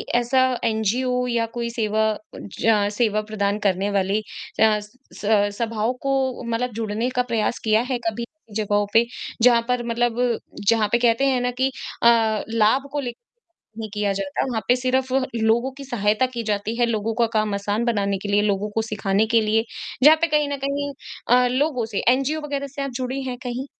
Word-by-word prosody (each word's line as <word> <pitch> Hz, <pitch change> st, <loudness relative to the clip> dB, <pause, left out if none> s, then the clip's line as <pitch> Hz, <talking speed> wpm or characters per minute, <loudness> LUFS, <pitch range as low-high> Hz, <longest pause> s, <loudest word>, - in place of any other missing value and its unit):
ऐसा 245 Hz, +2 st, +3 dB, 0.2 s
एनजीओ 245 Hz, +3 st, 0 dB
या 235 Hz, -2 st, +1 dB
कोई 235 Hz, 0 st, -2 dB
सेवा 220 Hz, -2 st, 0 dB, 0.4 s
ज 210 Hz, -2 st, +3 dB
सेवा 215 Hz, -3 st, +2 dB
प्रदान 210 Hz, -1 st, -2 dB
करने 195 Hz, +1 st, 0 dB
वाली 195 Hz, +1 st, +1 dB, 0.4 s
अ, 215 Hz, -1 st, +4 dB, 0.3 s
स -, -, -9 dB, 0.3 s
सभाओं 230 Hz, +1 st, -1 dB
को 270 Hz, -2 st, -1 dB
मतलब 235 Hz, +2 st, -2 dB
जुड़ने 225 Hz, +2 st, -2 dB
का 250 Hz, -, +3 dB
प्रयास 230 Hz, -2 st, -1 dB
किया 220 Hz, 0 st, +3 dB
है 255 Hz, -, 0 dB
कभी 235 Hz, +2 st, -2 dB, 0.3 s
जगहों 205 Hz, -1 st, +1 dB
पे 230 Hz, +1 st, +5 dB, 0.4 s
जहाँ 235 Hz, -1 st, +6 dB
पर 250 Hz, -1 st, 0 dB
मतलब 240 Hz, 0 st, 0 dB, 0.3 s
जहाँ 225 Hz, -2 st, +3 dB
पे 235 Hz, -, +4 dB
कहते 240 Hz, +2 st, +3 dB
हैं 260 Hz, -2 st, +2 dB
ना 245 Hz, -, 0 dB
कि 265 Hz, -, +2 dB, 0.3 s
अ, 225 Hz, -2 st, +4 dB
लाभ 230 Hz, +5 st, +2 dB
को 290 Hz, -, -2 dB
ले 245 Hz, -4 st, -3 dB, 0.7 s
ही 215 Hz, -, -5 dB
किया 205 Hz, -1 st, 0 dB
जाता 195 Hz, -1 st, -2 dB
वहाँ 240 Hz, -4 st, -2 dB
पे 245 Hz, -, +6 dB
सिर्फ 255 Hz, +1 st, 0 dB, 0.2 s
लोगों 230 Hz, +3 st, +2 dB
की 275 Hz, -, -8 dB
सहायता 215 Hz, -1 st, +1 dB
की 235 Hz, -, -2 dB
जाती 210 Hz, +1 st, -1 dB
है 240 Hz, -, +4 dB
लोगों 225 Hz, -1 st, -1 dB
का 235 Hz, -, +5 dB
काम 215 Hz, -1 st, +1 dB
आसान 205 Hz, +3 st, -1 dB
बनाने 200 Hz, -4 st, 0 dB
के 205 Hz, -, -5 dB
लिए, 205 Hz, +1 st, +3 dB
लोगों 205 Hz, 0 st, 0 dB
को 225 Hz, +2 st, -1 dB
सिखाने 215 Hz, -1 st, 0 dB
के 230 Hz, 0 st, +3 dB
लिए 220 Hz, +1 st, +1 dB, 0.4 s
जहाँ 305 Hz, +3 st, +8 dB
पे 335 Hz, -, +3 dB
कहीं 300 Hz, -2 st, +1 dB
न 285 Hz, -, -2 dB
कहीं 285 Hz, +1 st, -2 dB, 0.4 s
अ, 250 Hz, +1 st, +5 dB
लोगों 255 Hz, -1 st, 0 dB
से 220 Hz, -3 st, -3 dB
एनजीओ 275 Hz, +4 st, 0 dB
वगैरह 280 Hz, -1 st, -3 dB
से 280 Hz, -, -2 dB
आप 275 Hz, -, -3 dB
जुड़ी 260 Hz, +1 st, -3 dB
हैं 255 Hz, -2 st, -4 dB
कहीं? 250 Hz, +2 st, -4 dB
230 Hz, 190 wpm, -23 LUFS, 215-250 Hz, 0.7 s, जहाँ